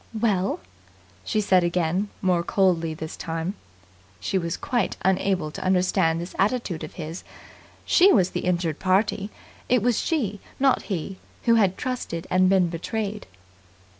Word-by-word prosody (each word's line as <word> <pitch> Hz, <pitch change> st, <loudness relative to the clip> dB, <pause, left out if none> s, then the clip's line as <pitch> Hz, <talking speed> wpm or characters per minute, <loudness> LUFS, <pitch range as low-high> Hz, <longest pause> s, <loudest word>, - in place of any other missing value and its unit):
"Well?" 200 Hz, -4 st, +1 dB, 0.6 s
she 215 Hz, -, 0 dB
said 185 Hz, -3 st, +4 dB
again, 175 Hz, +3 st, 0 dB
more 180 Hz, -2 st, +3 dB
coldly 170 Hz, -3 st, +1 dB
this 155 Hz, 0 st, -6 dB
time. 165 Hz, +3 st, -3 dB, 0.7 s
She 100 Hz, -, -3 dB
was 170 Hz, 0 st, -3 dB
quite 240 Hz, -6 st, -1 dB
unable 185 Hz, -4 st, +1 dB
to -, -, -7 dB
understand 180 Hz, -3 st, +2 dB
this 175 Hz, +2 st, -6 dB
attitude 200 Hz, -5 st, 0 dB
of -, -, -7 dB
his. 165 Hz, +1 st, -6 dB, 0.6 s
She 380 Hz, +3 st, +6 dB
was 185 Hz, -4 st, +3 dB
the -, -, -2 dB
injured 170 Hz, -4 st, 0 dB
party. 195 Hz, +2 st, +1 dB, 0.4 s
It 245 Hz, -3 st, +3 dB
was 245 Hz, -2 st, +2 dB
she, 220 Hz, -, -1 dB, 0.2 s
not 270 Hz, -1 st, +3 dB
he 185 Hz, 0 st, -3 dB, 0.2 s
who 230 Hz, -, +4 dB
had 200 Hz, -5 st, +3 dB
trusted 250 Hz, -10 st, -4 dB
and 185 Hz, 0 st, +4 dB
been 190 Hz, -2 st, +4 dB
betrayed. 205 Hz, +5 st, -4 dB
185 Hz, 145 wpm, -24 LUFS, 170-210 Hz, 0.7 s, She